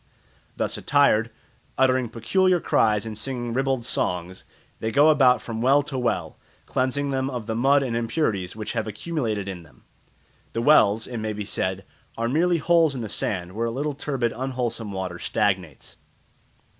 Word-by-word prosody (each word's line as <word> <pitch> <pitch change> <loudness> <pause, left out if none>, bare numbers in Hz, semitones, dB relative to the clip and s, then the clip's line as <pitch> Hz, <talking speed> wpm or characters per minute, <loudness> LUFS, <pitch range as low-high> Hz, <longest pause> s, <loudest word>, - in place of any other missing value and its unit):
Thus - - -1
attired, 115 -6 +3 0.5
uttering 130 -2 +2
peculiar 185 - +2
cries 105 -8 +2
and 110 -1 -5
singing 120 +1 -4
ribald 135 -1 0
songs, 90 -4 -2 0.3
they 110 - -2
go 145 +4 +5
about 130 -5 +4
from 115 -1 -5
well 140 +4 +4
to 135 -2 -4
well, 125 -1 -2 0.3
cleansing 140 +2 -1
them 130 0 -1
of 125 -4 -5
the 110 - -3
mud 135 +5 +3
and 120 -3 -2
impurities 115 - -1
which 110 -1 -5
have - - -2
accumulated 110 - -3
in 95 -3 -6
them. 80 -5 -20 0.7
The 115 - -1
wells, 110 -7 +5
it 120 - -6
may 110 0 -3
be 105 0 -5
said, 95 -1 -2 0.3
are 115 - -1
merely 170 +7 +2
holes 165 -2 +3
in 125 - -4
the 110 - -5
sand 90 -4 -2
where 115 +4 -2
a - - -2
little 145 +5 -2
turbid 135 -5 -2
unwholesome 120 -4 -3
water 95 -2 -4
stagnates. 95 -8 -2
120 Hz, 170 wpm, -24 LUFS, 105-135 Hz, 0.7 s, go